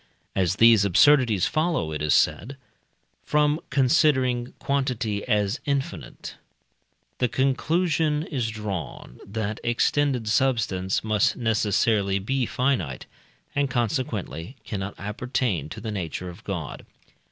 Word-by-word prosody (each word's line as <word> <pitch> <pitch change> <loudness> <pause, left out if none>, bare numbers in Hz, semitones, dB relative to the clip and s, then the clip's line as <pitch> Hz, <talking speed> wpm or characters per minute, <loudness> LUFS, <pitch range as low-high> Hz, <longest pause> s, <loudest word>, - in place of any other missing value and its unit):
As 95 -1 +1
these 115 -1 +6
absurdities 120 - +4
follow, 155 - 0
it 75 -1 -4
is 75 -2 +3
said, 135 +6 +1 0.7
from 150 +1 +2
considering 130 -3 +2
quantity 125 -7 -1
as 105 +2 +1
infinite, 140 -1 -4 0.8
the 125 - +3
conclusion 155 +4 +1
is 130 -8 -2
drawn, 105 -6 -6
that 105 +1 -4
extended 125 +1 +1
substance 110 -6 +1
must 110 -2 +2
necessarily 105 -3 +1
be 125 +5 -1
finite, 125 - -1 0.5
and, 140 -1 0
consequently, 120 - -2
cannot 100 -2 -5
appertain 105 - -2
to 110 - -7
the 110 0 -5
nature 90 -2 -4
of 85 - -12
God. - - -5
115 Hz, 110 wpm, -25 LUFS, 100-135 Hz, 0.8 s, these